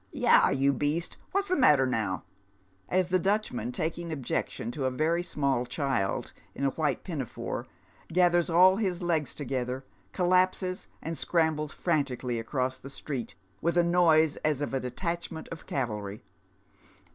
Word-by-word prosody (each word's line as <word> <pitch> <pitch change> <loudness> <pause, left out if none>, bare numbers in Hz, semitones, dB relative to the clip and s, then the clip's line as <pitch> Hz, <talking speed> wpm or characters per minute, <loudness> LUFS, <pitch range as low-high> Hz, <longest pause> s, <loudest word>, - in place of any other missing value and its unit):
Yah, - - +5
you 140 +1 +2
beast, 150 +6 -1
what's 395 0 0
the 365 - +3
matter 150 - +5
now? 110 -7 -1 0.3
" - - -39 0.3
as 185 -1 +2
the 185 0 +3
Dutchman, 185 - 0
taking 165 +4 -3
objection 130 -4 -2
to 135 +1 -3
a - - +3
very 155 +6 +1
small 140 -7 0
child 130 -7 -1 0.2
in - - -4
a 135 - +2
white 150 -1 -1
pinafore, 145 - -4 0.4
gathers 175 0 +3
all 185 +3 +6
his 185 -5 -1
legs 160 -4 0
together, 130 -1 -3 0.3
collapses, 185 - +1 0.2
and 165 +1 -3
scrambles 160 -3 +1
frantically 130 -7 -1
across 130 +2 -2
the 135 - -9
street, 135 -2 -5 0.3
with 170 +1 +1
a 175 - +6
noise 165 -3 +4
as 150 -3 0
of 145 -2 -3
a 135 - +1
detachment 170 +5 -4
of 165 - -9
cavalry. 105 -6 -3
155 Hz, 150 wpm, -29 LUFS, 130-175 Hz, 0.4 s, all